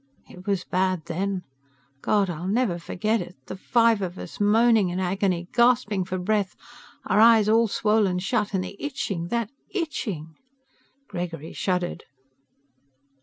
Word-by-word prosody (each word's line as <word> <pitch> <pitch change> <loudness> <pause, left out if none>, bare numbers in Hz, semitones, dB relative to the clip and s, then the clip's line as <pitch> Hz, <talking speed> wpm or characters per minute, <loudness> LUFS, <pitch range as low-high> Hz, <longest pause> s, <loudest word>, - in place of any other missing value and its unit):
It 180 +3 -14
was 195 -3 0
bad 185 -3 0
then. 185 +2 -2 0.6
God, 205 -2 +2
I'll 175 0 -4
never 205 -4 +1
forget 215 +6 -1
it! 180 - -8
The - - -6
five 230 +2 +3
of 185 -1 -4
us, - - -9
moaning 215 -1 +4
in 180 +1 -3
agony, 185 -1 0
gasping 235 -6 +3
for 185 0 -3
breath, 200 +1 0 0.5
our - - +2
eyes 225 -1 +7
all 225 +1 +4
swollen 210 -3 +2
shut, 205 +2 -1
and 185 - 0
the 200 - -7
itching... 245 - -3
that 235 +1 -2 0.2
itching." 210 - -4 0.7
Gregory 170 -5 -5
shuddered. 180 -2 -2
195 Hz, 140 wpm, -25 LUFS, 180-225 Hz, 0.7 s, eyes